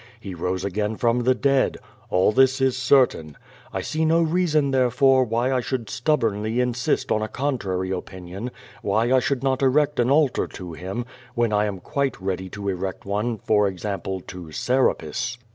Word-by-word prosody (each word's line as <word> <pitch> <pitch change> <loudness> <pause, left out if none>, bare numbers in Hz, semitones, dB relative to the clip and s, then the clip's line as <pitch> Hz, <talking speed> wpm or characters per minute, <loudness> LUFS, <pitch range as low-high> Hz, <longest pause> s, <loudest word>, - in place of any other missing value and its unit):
He 100 -4 -7
rose 90 +2 -2
again 105 +3 -1
from 120 +2 +1
the 130 0 +4
dead. 135 +1 +2 0.3
All 90 +3 +3
this 130 +3 +4
is 130 -1 +2
certain. 125 - +2 0.3
I - - -3
sec 155 - -3
no 160 +1 +3
reason, 155 -4 +1
tlierefore, 130 0 +3
wliy 120 +4 +1
I 130 - +1
should 120 -2 -4
stubbornly 115 -5 0
insist 125 0 0
on 110 - +2
a 110 - -1
contrary 100 -9 -2
opinion, 95 +4 -6 0.3
why 110 +5 +1
I 130 - +6
should 135 0 -1
not 130 -1 +1
erect 145 +2 +2
an 120 +1 +3
altar 145 -1 +2
to 90 -2 -8
Him, 95 +8 -5 0.3
when 120 -2 +1
I 105 0 +3
am 100 -3 -4
quite 140 +8 -2
ready 95 -1 -3
to 100 +1 -6
erect 95 -1 -3
one, 105 +4 -1
for 105 0 +2
example, 95 0 -4
to 90 -3 -10
Serapis. 125 +2 0
120 Hz, 175 wpm, -23 LUFS, 95-130 Hz, 0.3 s, I